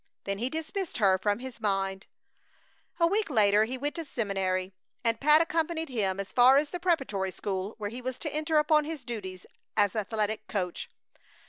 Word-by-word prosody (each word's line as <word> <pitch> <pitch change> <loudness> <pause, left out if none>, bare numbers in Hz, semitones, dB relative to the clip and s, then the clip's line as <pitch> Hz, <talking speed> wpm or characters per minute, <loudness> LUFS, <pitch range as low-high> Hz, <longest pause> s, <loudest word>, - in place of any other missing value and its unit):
Then 200 0 -3
he 245 +3 -1
dismissed 320 +4 -4
her 195 -4 +4
from 205 +1 +1
his 255 -1 -9
mind. 195 -2 -1 0.9
A 335 - +5
week 410 +4 +1
later 210 -4 +4
he 255 +3 -4
went 290 +3 -2
to 335 - -4
the - - -8
seminary, 195 -6 -1 0.3
and 230 -1 +1
Pat 300 +2 +6
accompanied 330 -1 -1
him 200 -6 -1
as 200 - -5
far 255 +2 +7
as 290 0 +1
the 355 - -4
preparatory 270 - 0
school 190 +2 -4
where 210 -2 -4
he 245 +2 -6
was 255 0 -4
to 305 - -4
enter 310 +1 +1
upon 300 0 +4
his 305 -3 -6
duties 190 -6 -6 0.3
as 205 -1 +3
athletic 215 0 -1
coach. 180 -4 -3
230 Hz, 190 wpm, -29 LUFS, 200-300 Hz, 0.9 s, far